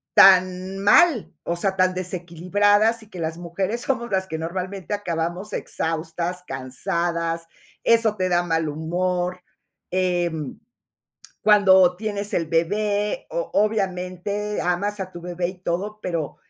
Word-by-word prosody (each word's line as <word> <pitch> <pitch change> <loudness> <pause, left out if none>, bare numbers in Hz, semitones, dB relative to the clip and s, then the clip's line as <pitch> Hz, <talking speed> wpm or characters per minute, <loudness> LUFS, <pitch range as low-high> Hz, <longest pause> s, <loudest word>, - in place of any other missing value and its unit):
tan 185 0 +5
mal, 235 - +4
o 170 - -2
sea, 190 +2 -1
tan 185 -1 +3
desequilibradas, 185 +5 +1
y 215 - -18
que 185 - -9
las 165 0 -3
mujeres 190 +6 -2
somos 240 -3 -1
las 190 -1 0
que 160 -2 -4
normalmente 185 +3 -4
acabamos 175 0 -3
exhaustas, 165 +2 -3
cansadas, 165 +5 -2 0.4
eso 230 -2 +4
te 185 -2 -1
da 175 -1 +3
mal 165 -2 0
humor. 180 +3 -2 0.5
Em, 175 -5 -1 0.8
cuando 190 -4 +6
tienes 205 0 -3
el 165 - 0
bebé, 205 +6 0
o - - -3
obviamente 200 0 -1
amas 200 +4 0
a 185 -1 -4
tu 175 - -9
bebé 175 0 -3
y 185 - -9
todo, 195 +5 -3
pero, 165 -6 -3
185 Hz, 130 wpm, -23 LUFS, 170-205 Hz, 0.8 s, cuando